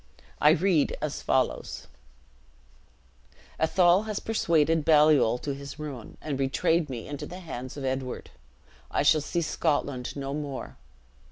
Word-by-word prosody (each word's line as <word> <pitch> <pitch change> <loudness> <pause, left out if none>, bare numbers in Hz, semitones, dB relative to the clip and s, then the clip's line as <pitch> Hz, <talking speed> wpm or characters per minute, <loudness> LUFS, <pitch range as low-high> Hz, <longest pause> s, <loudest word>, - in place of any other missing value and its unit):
I 150 - +7
read 165 -1 +2
as - - -3
follows: - - -1 1.7
"'Athol 175 +4 +4
has 215 -2 -2
persuaded 165 -7 +2
Baliol 150 -6 +5
to 140 - -2
his 140 0 -8
ruin, 140 -7 -8
and 145 -3 -3
betrayed 150 +4 +1
me 120 -4 -6
into 145 -1 -6
the 180 - -8
hands 130 -6 -7
of 140 - -4
Edward. 130 -1 -3 0.6
I - - 0
shall 150 +1 +5
see 170 +4 -2
Scotland 145 -5 -1
no 140 -1 -4
more. 145 -3 -5
150 Hz, 135 wpm, -27 LUFS, 135-165 Hz, 1.7 s, I